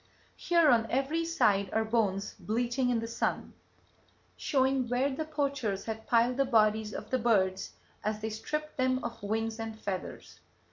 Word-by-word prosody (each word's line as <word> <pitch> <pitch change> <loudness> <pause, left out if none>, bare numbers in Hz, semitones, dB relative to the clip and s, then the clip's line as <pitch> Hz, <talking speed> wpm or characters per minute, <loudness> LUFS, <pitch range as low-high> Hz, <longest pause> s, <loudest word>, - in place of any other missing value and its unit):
"Here 335 -4 +4
on 225 -2 +3
every 275 +6 0
side 200 - +2
are 220 0 +1
bones 210 -3 0
bleaching 240 +3 0
in 240 -2 +2
the 230 - -4
sun, 230 - -2 0.8
showing 265 -2 +1
where 255 +3 +1
the 310 +4 -3
poachers 280 -10 -2
had 220 0 -5
piled 240 +2 +3
the 275 - +3
bodies 215 -3 +2
of 215 - -7
the 260 - +2
birds 195 -5 +1 0.3
as 215 0 -1
they 220 +1 -3
stripped 305 +8 -4
them 255 0 +1
of 235 0 -5
wings 220 +2 -2
and 225 -1 -5
feathers. 190 -4 -6
230 Hz, 160 wpm, -30 LUFS, 215-265 Hz, 0.8 s, Here